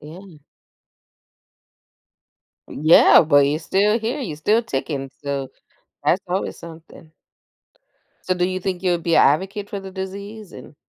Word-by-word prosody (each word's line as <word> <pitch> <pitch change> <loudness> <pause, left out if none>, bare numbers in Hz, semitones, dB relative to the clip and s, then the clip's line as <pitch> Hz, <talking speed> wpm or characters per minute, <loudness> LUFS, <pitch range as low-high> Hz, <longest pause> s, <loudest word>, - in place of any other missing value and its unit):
yeah. 170 +3 -13 2.3
Yeah, 155 +3 +6
but 145 -2 +4
you're 150 +2 -1
still 205 +6 +1
here. 235 +6 -3
You're 180 - -5
still 215 +8 +1
ticking, 135 -5 -4
so, 140 -2 -3 0.6
that's 185 - +2
always 185 +2 -3
something. 160 -1 -14 1.1
So 185 - +1
do 180 0 0
you 185 0 -3
think 185 0 -4
you'll 175 -2 +1
be 165 0 0
a - - +6
advocate 195 +8 +1
for 200 - -5
the 195 0 -10
disease? 200 +2 -8
And - - -12
180 Hz, 140 wpm, -21 LUFS, 155-200 Hz, 2.3 s, Yeah